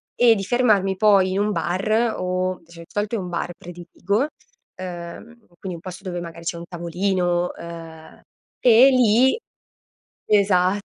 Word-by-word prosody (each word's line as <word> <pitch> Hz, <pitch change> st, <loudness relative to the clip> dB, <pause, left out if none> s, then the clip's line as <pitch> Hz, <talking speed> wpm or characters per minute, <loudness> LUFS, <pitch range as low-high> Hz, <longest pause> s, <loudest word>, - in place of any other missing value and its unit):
e 240 Hz, -2 st, +6 dB
di 195 Hz, -, -3 dB
fermarmi 210 Hz, -6 st, +2 dB
poi 195 Hz, -2 st, +4 dB
in 195 Hz, -, -1 dB
un 210 Hz, +1 st, +1 dB
bar 215 Hz, +6 st, 0 dB
o 185 Hz, 0 st, -2 dB
dicia 170 Hz, 0 st, -16 dB
di -, -, -12 dB
solito 210 Hz, +2 st, -2 dB
è -, -, 0 dB
un 180 Hz, -, -5 dB
bar 175 Hz, 0 st, -3 dB
prediligo, 175 Hz, -, -3 dB, 0.5 s
ehm, 175 Hz, -1 st, -7 dB, 0.3 s
quindi 185 Hz, -2 st, -6 dB
un -, -, -9 dB
posto 185 Hz, +2 st, -9 dB
dove 175 Hz, -1 st, -4 dB
magari 170 Hz, 0 st, -9 dB
c'è 170 Hz, -, -2 dB
un 170 Hz, -, -7 dB
tavolino, 175 Hz, 0 st, -1 dB
ehm, 165 Hz, -1 st, -11 dB, 0.4 s
e 245 Hz, +2 st, +7 dB
lì 255 Hz, -, +4 dB, 0.9 s
esatto. 195 Hz, -1 st, +3 dB
185 Hz, 155 wpm, -22 LUFS, 175-210 Hz, 0.9 s, e